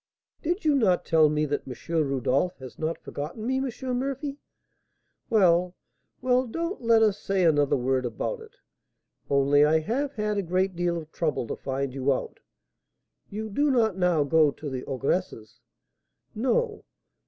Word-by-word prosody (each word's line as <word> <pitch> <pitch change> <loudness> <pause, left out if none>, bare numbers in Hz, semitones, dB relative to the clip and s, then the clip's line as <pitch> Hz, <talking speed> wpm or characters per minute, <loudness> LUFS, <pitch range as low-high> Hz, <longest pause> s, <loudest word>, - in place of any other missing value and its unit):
"Did 345 +3 -2
you 300 - +4
not 205 -10 +2
tell 160 -2 +4
me 150 0 +1
that 145 -1 -3
M. 125 - -6 0.3
Rodolph 135 +7 0
has 130 -2 -11
not 160 +1 -2
forgotten 160 +10 -6
me, 260 +2 0
M. 255 -1 -2
Murphy?" 275 +2 -4 0.9
"Well, 180 -4 +3 0.5
well, 255 0 +2
don't 335 - -4
let 230 -1 +4
us 210 -2 +2
say 195 -1 0
another 145 -4 +3
word 130 +1 0
about 120 - -3
it; 445 -1 -14 0.7
only 140 +1 +4
I 155 +2 +4
have 270 - -2
had 210 -1 -1
a - - +1
great 185 +1 0
deal 175 0 0
of 160 -1 -8
trouble 155 -7 -1
to - - -4
find 135 -1 -3
you 135 +1 0
out. 130 - -3 0.9
You 215 +2 -5
do 290 +8 +2
not 225 -7 +2
now 180 -5 +2
go 155 +1 +4
to 145 0 -7
the 130 -1 -4
ogress's?" 130 - -3 0.7
"No." 435 - 0
180 Hz, 160 wpm, -26 LUFS, -, 0.9 s, you